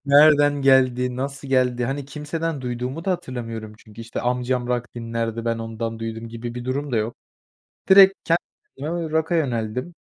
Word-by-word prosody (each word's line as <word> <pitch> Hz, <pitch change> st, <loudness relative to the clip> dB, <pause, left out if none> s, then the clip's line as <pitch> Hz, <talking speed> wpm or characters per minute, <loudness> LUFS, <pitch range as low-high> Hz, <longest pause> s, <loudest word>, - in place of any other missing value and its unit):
nereden 145 Hz, 0 st, +6 dB
geldi, 125 Hz, -2 st, +3 dB
nasıl 140 Hz, +1 st, -4 dB
geldi, 125 Hz, -2 st, +2 dB
hani, 135 Hz, +3 st, -3 dB
kimseden 150 Hz, +2 st, -4 dB
duyduğumu 125 Hz, +5 st, -4 dB
da 195 Hz, -, 0 dB
hatırlamıyorum. 115 Hz, -9 st, -4 dB
Çünkü, 110 Hz, -1 st, -13 dB
işte, 115 Hz, 0 st, -5 dB
amcam 125 Hz, 0 st, 0 dB
rock 125 Hz, 0 st, -2 dB
dinlerdi, 115 Hz, -1 st, -3 dB
ben 115 Hz, -1 st, 0 dB
ondan 115 Hz, 0 st, -4 dB
duydum 115 Hz, 0 st, -5 dB
gibi 115 Hz, +1 st, -6 dB
bir 125 Hz, 0 st, -6 dB
durum 140 Hz, +1 st, -2 dB
da -, -, +2 dB
yok. 110 Hz, +2 st, -1 dB, 0.8 s
Direkt 195 Hz, 0 st, +9 dB
ken 165 Hz, 0 st, +3 dB, 0.4 s
eee, 140 Hz, -, -6 dB
rock'a 160 Hz, 0 st, -1 dB
yöneldim. 125 Hz, 0 st, -1 dB
125 Hz, 160 wpm, -23 LUFS, 115-145 Hz, 0.8 s, Direkt